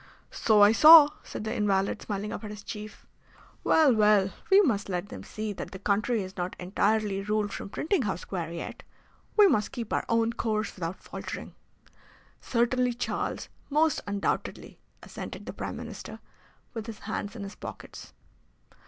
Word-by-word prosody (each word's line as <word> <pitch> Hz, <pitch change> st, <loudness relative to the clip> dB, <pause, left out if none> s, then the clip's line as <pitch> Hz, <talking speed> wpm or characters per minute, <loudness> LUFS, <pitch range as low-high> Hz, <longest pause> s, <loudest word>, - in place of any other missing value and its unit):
"So 215 Hz, -2 st, +4 dB
I 205 Hz, -, +7 dB
saw," 305 Hz, +4 st, +10 dB
said -, -, -7 dB
the 220 Hz, +1 st, -3 dB
invalid, 200 Hz, -3 st, 0 dB
smiling 205 Hz, 0 st, -4 dB
up -, -, -6 dB
at 210 Hz, -, -6 dB
his 210 Hz, 0 st, -9 dB
chief. 210 Hz, 0 st, -8 dB, 0.6 s
"Well, 305 Hz, -5 st, +5 dB
well, 210 Hz, -3 st, +4 dB, 0.2 s
we 390 Hz, +1 st, +7 dB
must 210 Hz, -, 0 dB
let 180 Hz, +2 st, -3 dB
them -, -, -8 dB
see 215 Hz, -1 st, -5 dB
that -, -, -7 dB
the 190 Hz, -, -8 dB
country 210 Hz, +3 st, 0 dB
is 185 Hz, 0 st, -9 dB
not 180 Hz, +1 st, -3 dB
entirely 200 Hz, +2 st, 0 dB
ruled 210 Hz, 0 st, -1 dB
from -, -, -6 dB
Printing 325 Hz, -, 0 dB
House 190 Hz, -7 st, -2 dB
Square 170 Hz, -4 st, -5 dB
yet. 170 Hz, -, -6 dB, 0.6 s
We 420 Hz, -, +8 dB
must 210 Hz, -, +1 dB
keep 235 Hz, -5 st, -5 dB
our -, -, +1 dB
own 230 Hz, 0 st, +2 dB
course 220 Hz, -2 st, -2 dB
without 175 Hz, 0 st, -6 dB
faltering." -, -, -7 dB, 0.9 s
"Certainly, 245 Hz, +1 st, +1 dB
Charles, 245 Hz, -, -3 dB, 0.2 s
most 305 Hz, +1 st, +2 dB
undoubtedly," 200 Hz, -1 st, -3 dB, 0.2 s
assented -, -, -8 dB
the -, -, -6 dB
Prime -, -, -5 dB
Minister, -, -, -8 dB, 0.6 s
with 225 Hz, -2 st, -6 dB
his 225 Hz, -2 st, -7 dB
hands 210 Hz, 0 st, -4 dB
in 210 Hz, -, -6 dB
his 195 Hz, +1 st, -7 dB
pockets. -, -, -10 dB
210 Hz, 165 wpm, -28 LUFS, 200-235 Hz, 0.9 s, saw